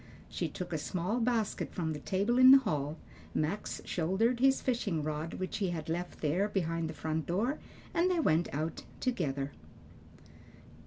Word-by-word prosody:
She 170 - -2
took 180 +2 -6
a 160 - 0
small 185 +9 -1
basket 230 -3 0
from 160 -4 -1
the 150 - -5
table 205 +9 +1
in 255 0 +9
the 270 - +11
hall, 155 - -1 0.4
Max 160 +7 -1
shouldered 190 +9 +1
his 270 +1 +4
fishing 205 - -1
rod, 155 +2 -3
which 185 - -3
he 195 -3 0
had 160 -2 -4
left 175 +2 -3
there 175 +7 +1
behind 165 -4 -1
the - - -5
front 155 -1 -2
door, 220 - 0 0.3
and 345 +2 +3
they 360 -2 +2
went 170 - +2
out 155 +3 -3 0.2
together. 140 - -1
180 Hz, 165 wpm, -32 LUFS, 160-230 Hz, 0.4 s, the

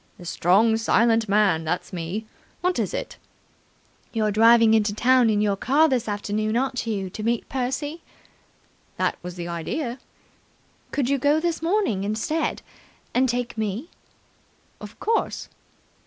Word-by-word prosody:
"The 175 - -12
strong, 200 +7 +3
silent 225 -1 +2
man. 200 -5 +3
That's 170 +4 -3
me. 180 +5 -4 0.4
What 360 0 0
is - - -1
it?" - - -5 0.9
"You're 215 -2 0
driving 225 +1 +6
into 210 -2 +2
town 250 +1 +4
in 210 -1 +2
your 205 -1 +2
car 285 +10 +3
this 255 -6 0
afternoon, 215 +2 -1
aren't 260 -2 -1
you, 200 -4 -2
to 215 - -7
meet 230 +1 -1
Percy?" 270 +5 -3 1.0
"That - - 0
was 180 0 -7
the 175 -1 -5
idea." 235 - -4 0.9
"Could 275 -4 -1
you 280 +1 +1
go 290 +4 +3
this 335 -1 -1
morning 330 - 0
instead 220 +10 -2 0.5
and 260 +1 +2
take 245 -1 -2
me?" 220 - -3 0.9
"Of - - -11
course." 455 +1 -1
225 Hz, 140 wpm, -24 LUFS, 205-265 Hz, 1.0 s, driving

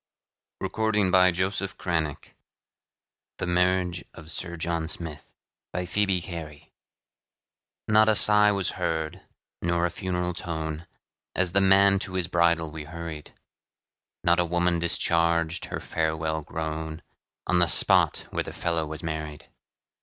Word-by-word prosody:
THE - - -3
WIT 110 -1 -1
AND 100 -3 +2
HUMOR 90 0 +4
OF 95 0 -3
AMERICA 80 -5 -2 1.1
THE - - -3
MARRIAGE 90 -1 +1
OF 80 0 -8
SIR 85 +2 -2
JOHN 85 -1 -2
SMITH 80 -3 -5 0.4
BY 90 0 -2
PHOEBE 95 -1 +1
CARY 80 -5 -9 1.1
Not 110 0 +5
a 110 - +4
sigh 105 0 +6
was 100 -2 0
heard, 80 -2 -2 0.4
nor 85 0 +1
a 85 - -1
funeral 90 -2 -2
tone, 80 -1 -5 0.5
As 90 -1 +1
the 100 +2 +3
man 100 0 +5
to 95 -1 -2
his 90 -2 0
bridal 85 -2 +2
we 80 -1 -7
hurried; 85 -1 -8 0.9
Not 85 +1 +3
a 85 - +2
woman 85 0 +1
discharged 85 0 +1
her - - -5
farewell 80 0 -2
groan, 80 0 -5 0.4
On 90 - +2
the 85 - +4
spot - - +4
where - - -1
the - - -8
fellow 85 -2 -2
was 80 +2 -8
married. 75 -2 -5
85 Hz, 140 wpm, -26 LUFS, 80-90 Hz, 1.1 s, sigh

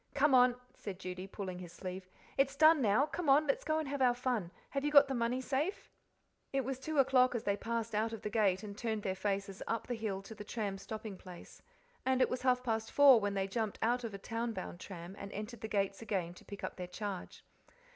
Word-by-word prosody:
"Come 285 0 +4
on," 250 -1 +6 0.2
said 200 -3 -7
Judy, 185 0 -6
pulling 190 -2 -6
his 175 -2 -8
sleeve; 185 +1 -7 0.3
"it's 275 0 +2
done 310 +1 +6
now, 225 +4 +4
come 320 0 -3
on, 290 +3 +6
let's 275 - 0
go 310 0 +1
and 315 -2 -2
have 280 0 -3
our 245 -2 +5
fun; 245 -8 -1 0.2
have 275 0 -1
you 295 - +2
got 285 -1 +8
the 270 - -2
money 240 +1 0
safe?" 290 +9 -2 0.6
It 270 -2 0
was 265 0 -3
two 310 +3 -4
o'clock 255 -2 +5
as 230 - -2
they 200 - +1
passed 230 +1 -3
out 220 +2 +1
of 225 - -7
the 210 - -2
gate 200 -3 +2
and 205 -1 -7
turned 220 -1 -2
their 190 - 0
faces 195 0 -2
up, 230 0 -1
the 245 - -3
hill 210 -4 -3
to 210 - -9
the 210 -1 -8
tram 205 -3 -3
stopping 215 -1 -6
place. 180 -2 -12 0.4
And 260 0 +2
it - - +3
was 250 - -2
half 250 -1 +2
past 225 -2 -1
four 280 -4 +8
when 205 -1 -1
they 195 -1 +1
jumped 215 +1 -2
out 245 +2 +2
of 220 -4 -4
a - - -4
town 230 +3 -3
bound 175 - -6
tram 185 -1 -8
and 200 0 -7
entered 215 +2 -6
the 220 - -3
gates 195 -1 -1
again 185 -6 -2
to - - -16
pick 200 - -9
up - - -4
their 180 -1 -5
charge. 195 0 -6
225 Hz, 240 wpm, -34 LUFS, 195-255 Hz, 0.6 s, got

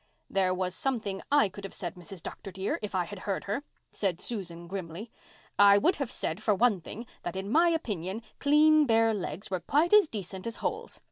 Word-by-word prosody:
"There 190 -1 +2
was 185 0 -1
something 215 -6 -2
I 290 -6 +5
could 200 +1 -11
have 195 - -6
said, 175 -3 -4
Mrs. 180 0 -10
Dr. 195 - -7
dear, 190 +2 -2
if 210 -2 -4
I 180 - +2
had 195 +3 -8
heard 195 0 -3
her," 205 +7 -2 0.3
said 185 -4 -1
Susan 175 -7 -5
grimly. 190 +4 -6 0.5
"I 200 0 +8
would 335 - +3
have 275 -5 -2
said, 165 +6 -3
for 215 -2 +2
one 215 -3 +3
thing, 230 +8 -8 0.2
that 175 - -5
in 195 +2 -4
my 335 +5 +5
opinion 210 - -2 0.2
clean 300 +1 +5
bare 225 -1 +4
legs 195 -1 -4
were 185 - 0
quite 310 - +2
as 420 -4 +8
decent 195 - -6
as 230 - -3
holes. - - -4
200 Hz, 205 wpm, -29 LUFS, 185-240 Hz, 0.5 s, I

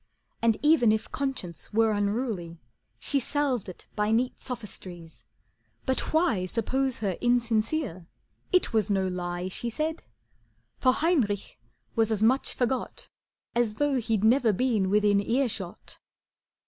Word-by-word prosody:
And 230 -2 +3
even 295 -7 +5
if 220 0 -1
conscience 260 - -4
were 225 +1 +3
unruly 205 -5 -2 0.4
She 275 - 0
salved 265 -5 -1
it 180 - -11
by 210 0 +1
neat 240 +3 +1
sophistries, 185 -9 -9 0.6
but 260 -1 -1
why 245 - +2
Suppose 260 +5 0
her 190 -3 -1
insincere, 235 - 0 0.4
it 365 -9 +3
was 220 -2 +2
no 195 -2 +1
lie 175 0 -3
She 235 +5 -3
said, 315 +7 -2 0.8
for 255 - +5
Heinrich 250 - 0 0.4
was 225 -1 +2
as 215 -1 +1
much 255 +5 +2
forgot 255 +1 -2 0.4
As 235 -3 +1
though 285 0 +1
he'd 220 -3 0
never 230 +1 +4
been 215 -3 +1
within 205 0 +4
earshot. 225 -6 -2
225 Hz, 130 wpm, -27 LUFS, 200-260 Hz, 0.8 s, even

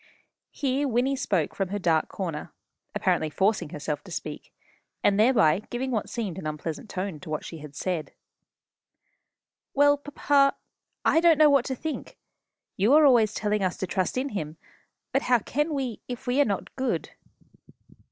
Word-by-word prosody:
Here 280 0 -1
Wynnie 255 +2 +1
spoke 185 - 0
from 195 - -1
her 205 - -2
dark 165 -5 +2
corner, 165 -6 -5 0.4
apparently 155 - +1
forcing 190 +3 +1
herself 150 -1 -4
to - - -11
speak, - - -6 0.5
and 200 0 +3
thereby 215 -8 +4
giving 260 +2 -3
what 220 -4 -1
seemed 205 -7 -4
an 155 - -5
unpleasant 155 +6 -5
tone 185 -4 -4
to 155 - -11
what 155 - -3
she 160 -3 -8
said. 165 +1 -3 1.6
"Well, 285 +1 +5
papa, 285 -1 +2 0.5
I 325 - +5
don't 335 -2 +5
know 305 -1 +6
what 275 -3 +4
to 265 - -2
think. 315 +4 -6 0.6
You 210 +8 +3
are 305 0 +7
always 230 -6 +5
telling 210 0 0
us 185 -1 -1
to - - -2
trust 185 +5 -1
in 270 +2 -1
Him; 160 - -5 0.5
but 270 - +2
how 250 -2 +4
can 295 +7 -1
we, 265 -6 -3
if 245 -2 -6
we 250 +3 +2
are - - +4
not 200 -5 -3
good?" 265 -1 -2
220 Hz, 165 wpm, -26 LUFS, 180-275 Hz, 1.6 s, are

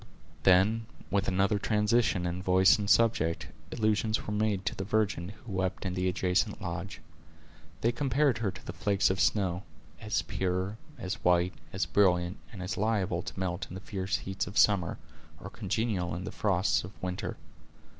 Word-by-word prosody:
Then, 100 +6 +4 0.2
with 100 0 +1
another 95 +2 +2
transition 105 -2 +2
in 90 +1 -2
voice 95 +2 +5
and 100 0 -2
subject, 110 -9 +3 0.2
allusions 110 0 +1
were 105 - -3
made 105 -2 0
to - - 0
the 95 - -4
virgin 100 -4 0
who 105 +2 -11
wept 95 0 -2
in 95 - -1
the 90 0 0
adjacent 90 +4 0
lodge. 90 +4 -5 0.8
They 115 - +3
compared 135 0 +1
her 110 -3 0
to 95 - -8
flakes 100 -1 +2
of 95 - -2
snow; 95 -4 +2 0.4
as 105 -7 -1
pure, 95 +4 -2 0.2
as 95 -4 -5
white, 90 0 +3 0.2
as 95 - -1
brilliant, 90 -2 +2
and 95 -4 -7
as 90 +1 -3
liable 100 -5 0
to - - -7
melt 90 0 -2
in - - -8
the - - -5
fierce 95 0 -3
heats 95 -1 -4
of 100 - -6
summer, 95 -6 +4 0.4
or - - -8
congeal 95 -4 -1
in 90 - -5
the 95 - -5
frosts 100 0 +1
of 95 +3 -9
winter. 90 0 -3
95 Hz, 170 wpm, -30 LUFS, 90-105 Hz, 0.8 s, voice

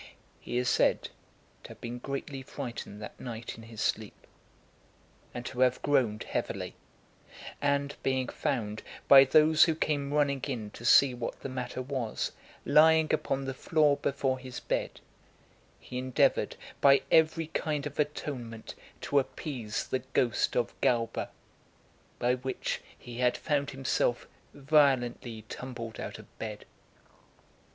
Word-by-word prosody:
He 120 - -4
is 125 0 0
said - - +2 0.5
to - - -9
have - - -12
been 120 +1 -6
greatly 140 +1 -5
frightened 120 -6 -7
that - - -9
night 115 -2 -6
in 115 - -12
his 115 -1 -8
sleep, 110 -1 -2 1.1
and 120 0 -7
to 125 - -6
have 125 0 +3
groaned 125 -7 +2
heavily; - - -3 0.9
and 140 0 +1
being 130 -1 0
found, 110 -6 -2 0.3
by 135 -1 +10
those 155 +3 +6
who 160 - +1
came 145 -3 -1
running 140 -2 +2
in 115 -6 -4
to 120 - -10
see 130 +2 +7
what 120 -1 -5
the 135 - -5
matter 130 0 -4
was, 130 -4 -2 0.3
lying 160 0 +5
upon 135 0 0
the 135 - -3
floor 150 +1 +2
before 135 -1 -1
his 130 -1 -7
bed, - - -3 0.8
he 125 - -6
endeavoured 130 -1 +2 0.3
by 140 0 +6
every 160 0 +4
kind 150 -2 -2
of 145 0 -6
atonement 130 -6 -3 0.3
to 140 - +2
appease 125 -5 -4
the 130 - -1
ghost 125 -3 0
of 120 -1 0
Galba, 115 -2 +1 0.9
by 125 +1 +2
which 130 +1 -3 0.2
he 120 0 -9
had 125 -1 +2
found 145 -2 0
himself 130 -2 0 0.2
violently 135 -5 +2
tumbled 120 -3 -7
out - - -5
of - - -16
bed. 105 -2 -6
130 Hz, 140 wpm, -30 LUFS, 120-140 Hz, 1.1 s, by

